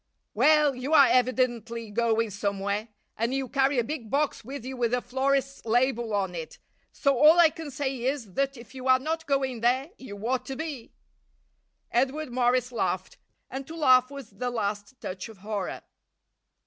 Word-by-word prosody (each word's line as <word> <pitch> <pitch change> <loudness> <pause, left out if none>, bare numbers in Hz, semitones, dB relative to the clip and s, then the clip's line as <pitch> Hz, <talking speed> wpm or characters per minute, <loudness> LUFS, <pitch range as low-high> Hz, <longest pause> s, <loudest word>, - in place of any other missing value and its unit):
"Well, 300 -2 +4
you 255 +4 -3
are 280 - +9
evidently 240 -3 0
going 230 0 +1
somewhere, 200 +1 -2 0.3
and 235 +4 -1
you 270 -1 -2
carry 270 +1 +1
a 240 - +3
big 235 -3 -5
box 285 0 0
with 265 +1 -7
you 260 0 -5
with 245 -1 +1
a - - 0
florist's 275 +2 -1
label 240 0 +1
on 190 -3 -1
it, 165 -2 -7 0.3
so 280 -1 +1
all 310 +4 +7
I 335 -2 +7
can 320 -1 -7
say 265 -2 -3
is 255 -8 -2
that 275 +2 -1
if 235 +1 -13
you 260 0 -6
are 255 0 +6
not 320 +4 -3
going 265 -4 0
there 260 +6 +1
you 205 -6 -9
ought 255 0 -1
to 270 - -4
be." 290 -5 -6 1.0
Edward 265 +3 0
Morris 250 0 +1
laughed, 240 - -2 0.3
and 265 0 -6
to 325 - -8
laugh 255 -5 +5
was 275 -5 -9
the 245 +6 -3
last 210 +1 -3
touch 185 +3 -6
of 220 - -13
horror. 210 -3 -4
255 Hz, 175 wpm, -27 LUFS, 230-275 Hz, 1.0 s, are